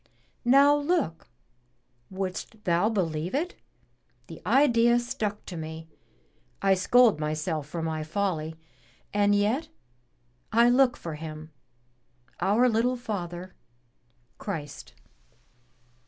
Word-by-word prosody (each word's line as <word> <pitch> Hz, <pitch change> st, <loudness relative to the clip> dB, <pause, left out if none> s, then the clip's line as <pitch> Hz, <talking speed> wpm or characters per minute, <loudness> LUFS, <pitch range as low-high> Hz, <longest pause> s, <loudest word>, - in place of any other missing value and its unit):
Now 280 Hz, +4 st, +6 dB
look! 290 Hz, -, -1 dB, 0.8 s
wouldst 190 Hz, +3 st, -5 dB
thou 175 Hz, +3 st, +2 dB
believe 175 Hz, -3 st, -2 dB
it? 340 Hz, +6 st, -1 dB, 0.7 s
the -, -, -11 dB
idea 240 Hz, -4 st, +4 dB
stuck 215 Hz, -3 st, -3 dB
to 180 Hz, -, -7 dB
me 160 Hz, 0 st, -7 dB, 0.4 s
— -, -, -39 dB, 0.3 s
I 195 Hz, 0 st, +5 dB
scold 215 Hz, +1 st, +4 dB
myself 155 Hz, 0 st, -2 dB
for 165 Hz, 0 st, -4 dB
my 160 Hz, -1 st, -2 dB
folly, 160 Hz, -2 st, -2 dB, 0.6 s
and 205 Hz, 0 st, +3 dB
yet 230 Hz, +11 st, 0 dB, 0.8 s
I 235 Hz, +2 st, +5 dB
look 250 Hz, 0 st, +4 dB
for 165 Hz, -, -6 dB
Him, 155 Hz, 0 st, -8 dB, 0.9 s
our 210 Hz, +7 st, +3 dB
little 245 Hz, +2 st, +1 dB
Father, 185 Hz, -6 st, -5 dB, 0.9 s
Christ!" 150 Hz, -8 st, -6 dB
200 Hz, 105 wpm, -27 LUFS, 160-240 Hz, 0.9 s, Now